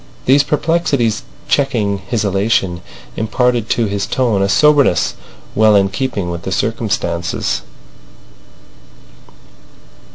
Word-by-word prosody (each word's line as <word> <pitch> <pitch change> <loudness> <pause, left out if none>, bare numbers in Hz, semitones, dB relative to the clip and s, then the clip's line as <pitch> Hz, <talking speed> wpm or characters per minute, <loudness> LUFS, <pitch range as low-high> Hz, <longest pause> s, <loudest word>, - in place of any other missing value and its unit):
These 135 +3 +5
perplexities 150 -7 0 0.3
checking 115 -8 0
his 105 +3 -2
elation 95 -3 0 0.3
imparted 120 +1 0
to 115 - +1
his 100 -1 -2
tone 115 -7 0
a 100 - +1
soberness 145 -7 +3 0.4
well 110 -1 +4
in 100 -1 +3
keeping 100 -4 -3
with 85 0 -5
the 95 - -5
circumstances. 95 -6 -2
110 Hz, 100 wpm, -16 LUFS, 100-125 Hz, 0.4 s, These